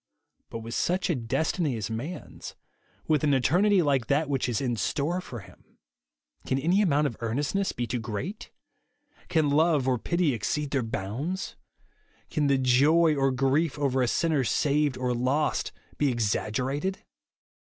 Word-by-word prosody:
But 115 - -6
with 115 +1 -7
such 180 +5 0
a - - +1
destiny 135 +3 -1
as 110 0 -4
man's; 140 +11 -6 0.5
with 155 -2 +2
an 145 -2 +3
eternity 180 - +3
like 135 -6 +1
that 145 +2 +1
which 135 -2 0
is 115 - 0
in 125 -3 -1
store 155 - -1
for 120 - -8
him, 100 - -19 0.3
— - - -43
can 130 - +1
any 175 +9 +2
amount 150 -6 +2
of 120 -6 -2
earnestness 145 - -1
be 120 - -3
too 120 +1 -3
great? 115 - -5 0.8
Can 155 -3 +2
love 150 -3 +3
or 125 -2 +1
pity 170 -2 +1
exceed 140 +8 -2
their 135 - +1
bounds? 120 - -4 0.8
Can 150 -2 +1
the 140 -1 +3
joy 145 +6 +4
or 135 -1 +2
grief 135 +4 +1
over 135 -2 +1
a 125 - +2
sinner 155 0 +1
saved 145 +1 +1
or 125 -1 -1
lost 130 +5 0 0.3
be 145 - +3
exaggerated 125 - -1
140 Hz, 160 wpm, -27 LUFS, 125-155 Hz, 0.8 s, joy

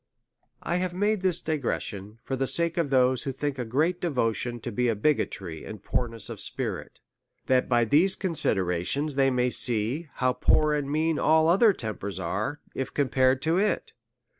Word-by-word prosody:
1 175 +1 -1
have 180 -1 -3
made 205 +1 +1
this 185 -3 +1
digression, 115 -8 -3
for 135 - -3
the 135 0 -1
sake 170 +2 +1
of 165 -4 0
those, 130 -1 +3
who 140 - -3
think 135 0 -3
a - - -1
great 155 +10 0
devotion 120 -6 -1
to 120 - -6
be 125 +2 +1
bigotry 100 - -1
and 105 -2 -9
poorness 115 -3 -3
of - - -7
spirit; - - -4 0.5
that 130 -1 +2
by 120 -2 +3
these 165 - +4
considerations 140 - -1
they 135 0 +3
may 125 -1 +1
see, 120 +9 +1
how 130 0 +1
poor 155 +3 +3
and 145 -2 -2
mean 155 +1 0
all 160 0 +4
other 200 +6 +5
tempers 105 - -5
are, 105 +11 -3
if 135 - -4
compared 130 -1 +2
to 165 +3 +2
it. 210 +1 -1
135 Hz, 170 wpm, -26 LUFS, 120-160 Hz, 0.5 s, other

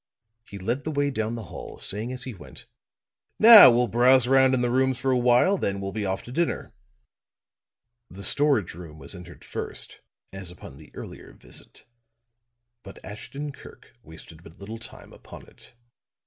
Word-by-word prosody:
He 100 - -8
led 115 +9 -3
the - - -4
way 145 -1 -1
down 110 -2 -3
the 115 - -7
hall, - - -9
saying 110 +5 -2
as 130 0 -6
he 130 - -7
went: 70 -9 -13 0.7
"Now 220 - +10
we'll 120 +1 +3
browse 125 +3 +4
around 130 0 +4
in 125 - -1
the 120 -1 0
rooms 130 0 +1
for 130 +2 -1
a - - +2
while; 125 +11 +3
then 100 0 -2
we'll 95 0 -5
be 105 -1 -4
off 95 0 -3
to 120 - -11
dinner." 170 +6 -2 1.4
The 100 +2 -11
storage 140 - +1
room 80 -3 -11
was 70 -2 -7
entered 90 -1 -12
first - - -7 0.3
as 95 -2 -7
upon 85 -6 -11
the 75 - -15
earlier - - -10
visit, - - -12 1.0
but 95 - -13
Ashton 135 +9 -7
Kirk - - -16
wasted 80 -2 -13
but 80 0 -16
little 110 +3 -9
time - - -13
upon - - -14
it. - - -16
115 Hz, 175 wpm, -25 LUFS, 95-130 Hz, 1.4 s, Now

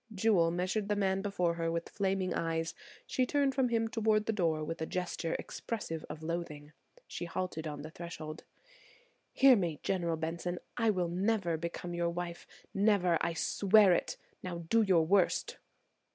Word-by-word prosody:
Jewel 190 -5 +3
measured 185 +4 -1
the 210 - +2
man 195 -1 +1
before 180 -4 0
her 165 -1 -1
with 170 0 -2
flaming 190 -2 -1
eyes; 165 0 -1 0.3
she 255 - 0
turned 280 -1 +2
from 260 -2 +2
him 225 -1 +1
toward 220 -2 +1
the 225 - 0
door 165 -6 +1
with 165 +1 -5
a 160 - -1
gesture 180 -2 -2
expressive 165 -8 -5
of 155 +1 -7
loathing; 155 -3 -4 0.3
she - - -5
halted 170 -2 -3
on 145 -1 -6
the 155 - -8
threshold. 165 -2 -7 0.9
"Hear 270 -1 +7
me, 170 -8 -1
General 170 -4 0
Benson, 170 +2 -3 0.2
I 230 -2 +2
will 180 -4 +1
never 185 0 0
become 170 +2 -5
your 170 0 0
wife; 170 0 -5 0.3
never, 195 -4 +3
I 170 - 0
swear 200 +3 +4
it. - - -1 0.2
Now 170 -2 -5
do 230 - +5
your 185 -6 +4
worst." 190 +1 +2
175 Hz, 165 wpm, -32 LUFS, 165-205 Hz, 0.9 s, Hear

